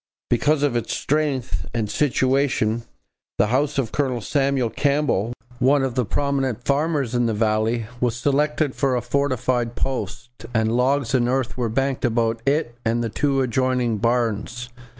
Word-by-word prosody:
Because 145 Hz, +5 st, +2 dB
of 140 Hz, -4 st, +1 dB
its 120 Hz, -, -1 dB
strength 130 Hz, -, -1 dB
and 110 Hz, -2 st, 0 dB
situation, 130 Hz, -2 st, +1 dB, 0.5 s
the 100 Hz, +2 st, +3 dB
house 145 Hz, +2 st, +1 dB
of 125 Hz, -5 st, 0 dB
Colonel 130 Hz, -4 st, 0 dB
Samuel 135 Hz, -1 st, 0 dB
Campbell, 140 Hz, -7 st, +1 dB, 0.3 s
one 135 Hz, +2 st, +4 dB
of 130 Hz, -2 st, -1 dB
the 125 Hz, -1 st, 0 dB
prominent 135 Hz, -1 st, -1 dB
farmers 140 Hz, -3 st, 0 dB
in 120 Hz, -1 st, +2 dB
the 110 Hz, -, 0 dB
valley, 110 Hz, +1 st, +1 dB
was 125 Hz, -2 st, +1 dB
selected 145 Hz, +3 st, +1 dB
for 135 Hz, -2 st, +1 dB
a 120 Hz, -, 0 dB
fortified 125 Hz, -2 st, 0 dB
post, 125 Hz, -1 st, -3 dB, 0.2 s
and 110 Hz, +1 st, +2 dB
logs 130 Hz, 0 st, +1 dB
and 120 Hz, -2 st, +2 dB
earth 130 Hz, -1 st, -1 dB
were 120 Hz, -2 st, -1 dB
banked 135 Hz, +3 st, -1 dB
about 115 Hz, -1 st, +1 dB
it 140 Hz, -4 st, +1 dB
and 115 Hz, +1 st, 0 dB
the 115 Hz, -, -1 dB
two 135 Hz, +3 st, +1 dB
adjoining 125 Hz, -2 st, 0 dB
barns. 120 Hz, +1 st, -1 dB
125 Hz, 155 wpm, -22 LUFS, 115-140 Hz, 0.5 s, one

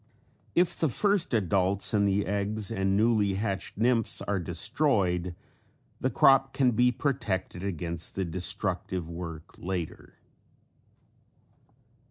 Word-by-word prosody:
If 175 Hz, 0 st, +3 dB
the 160 Hz, -, +1 dB
first 200 Hz, -, +1 dB
adults 100 Hz, -3 st, +1 dB
and 100 Hz, -1 st, +3 dB
the 100 Hz, +1 st, +1 dB
eggs 100 Hz, +1 st, -2 dB
and 95 Hz, -2 st, +1 dB
newly 105 Hz, -3 st, +2 dB
hatched 100 Hz, -2 st, -3 dB
nymphs 115 Hz, 0 st, +1 dB
are 100 Hz, -1 st, -1 dB
destroyed 90 Hz, -, 0 dB, 0.6 s
the -, -, 0 dB
crop 135 Hz, 0 st, +4 dB
can 130 Hz, -3 st, +3 dB
be 125 Hz, +2 st, +3 dB
protected 120 Hz, -9 st, -2 dB
against 85 Hz, -3 st, -3 dB
the 95 Hz, -, -1 dB
destructive 90 Hz, 0 st, -2 dB
work 85 Hz, -2 st, -8 dB
later. 90 Hz, -3 st, -5 dB
100 Hz, 115 wpm, -28 LUFS, 90-115 Hz, 0.6 s, crop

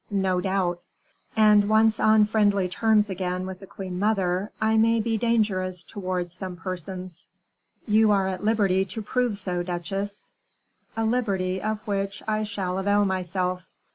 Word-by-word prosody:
"No 190 Hz, -3 st, +1 dB
doubt." 180 Hz, -2 st, -1 dB, 0.6 s
"And 210 Hz, -1 st, +5 dB
once 220 Hz, 0 st, +4 dB
on 215 Hz, -1 st, +5 dB
friendly 205 Hz, -3 st, +2 dB
terms 215 Hz, +2 st, +2 dB
again 185 Hz, -1 st, -3 dB
with 190 Hz, 0 st, -7 dB
the 195 Hz, -, -12 dB
queen 185 Hz, -2 st, -6 dB
mother, 195 Hz, -2 st, 0 dB
I 220 Hz, 0 st, +2 dB
may 225 Hz, +1 st, +4 dB
be 225 Hz, +1 st, 0 dB
dangerous 195 Hz, -6 st, 0 dB
towards 180 Hz, -3 st, -4 dB
some 185 Hz, 0 st, -6 dB
persons." 185 Hz, +1 st, -7 dB, 0.6 s
"You 215 Hz, 0 st, +4 dB
are 195 Hz, -2 st, +3 dB
at 190 Hz, +1 st, -4 dB
liberty 200 Hz, -4 st, +2 dB
to 195 Hz, +4 st, -6 dB
prove 245 Hz, -1 st, 0 dB
so, 180 Hz, -3 st, -2 dB
duchesse." 195 Hz, +3 st, -5 dB, 0.7 s
"A 225 Hz, -, +1 dB
liberty 195 Hz, -6 st, 0 dB
of 215 Hz, 0 st, -3 dB
which 200 Hz, -2 st, -3 dB
I 215 Hz, 0 st, 0 dB
shall 190 Hz, -3 st, -3 dB
avail 205 Hz, +1 st, +2 dB
myself." 185 Hz, -1 st, -1 dB
195 Hz, 150 wpm, -25 LUFS, 185-215 Hz, 0.7 s, And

